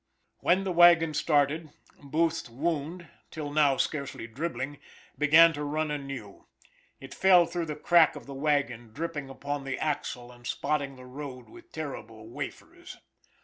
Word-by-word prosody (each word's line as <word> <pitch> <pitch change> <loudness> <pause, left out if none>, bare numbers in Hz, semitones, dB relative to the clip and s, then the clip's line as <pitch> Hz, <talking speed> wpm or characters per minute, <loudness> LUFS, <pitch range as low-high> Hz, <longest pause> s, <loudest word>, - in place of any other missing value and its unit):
When 185 +2 +2
the 190 - -2
wagon 170 -2 +6
started, 150 +1 +1 0.3
Booth's 160 +1 -1
wound 160 +6 -3 0.2
till 150 -3 -6
now 145 -3 +4
scarcely 140 -5 -2
dribbling, 135 +2 -4 0.4
began 160 +3 +6
to 150 -1 -4
run 155 +1 -1
anew. 135 -8 -7 0.5
It 135 0 -10
fell 185 -2 +6
through 170 0 -3
the 150 - -4
crack 165 +2 +4
of - - -9
the 140 - -8
wagon, 135 -6 -1
dripping 150 -2 -4
upon 140 +1 -4
the 135 -1 -3
axle, 125 -5 -3
and 120 -1 -12
spotting 140 +1 -1
the 130 0 -13
road 130 -1 -8
with 350 0 -15
terrible 115 -8 -7
wafers. 115 - -8
145 Hz, 145 wpm, -28 LUFS, 135-165 Hz, 0.5 s, wagon